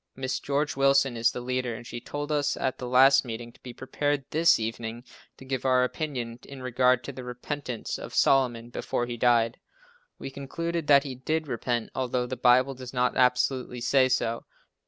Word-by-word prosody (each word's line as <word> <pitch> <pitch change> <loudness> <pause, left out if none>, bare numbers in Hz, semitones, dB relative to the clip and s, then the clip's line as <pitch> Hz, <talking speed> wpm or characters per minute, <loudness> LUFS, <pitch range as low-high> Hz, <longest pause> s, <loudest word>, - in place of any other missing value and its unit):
Mrs. 130 0 -3
George 145 +1 -1
Willson 135 -1 +3
is 115 0 +3
the 125 - -6
leader 125 -1 -2
and 120 - -10
she 120 0 -7
told 145 +4 -5
us 145 -1 0
at 130 - -2
the 125 - -5
last 135 +2 +6
meeting 120 -1 -7
to - - -24
be 125 - -8
prepared 140 +3 -2
this 165 +2 +5
evening 115 +1 -5 0.3
to 130 - -13
give 130 -2 -3
our 130 -1 +3
opinion 125 -4 -4
in 135 -2 -11
regard 125 0 +2
to 140 - -6
the 130 -1 -9
repentance 125 0 -5
of - - -8
Solomon 120 -3 +2
before 120 - -2
he 120 0 -5
died. 120 -1 +2 0.6
We 135 - -7
concluded 165 +4 -4
that 140 -1 +6
he 135 -3 -5
did 155 +5 -2
repent 120 -2 -2
although 125 -1 -1
the 125 +1 -4
Bible 130 +2 +4
does 130 -1 -10
not 125 0 +1
absolutely 125 0 +1
say 130 +2 +3
so. 115 -2 -1
130 Hz, 190 wpm, -27 LUFS, 120-140 Hz, 0.6 s, last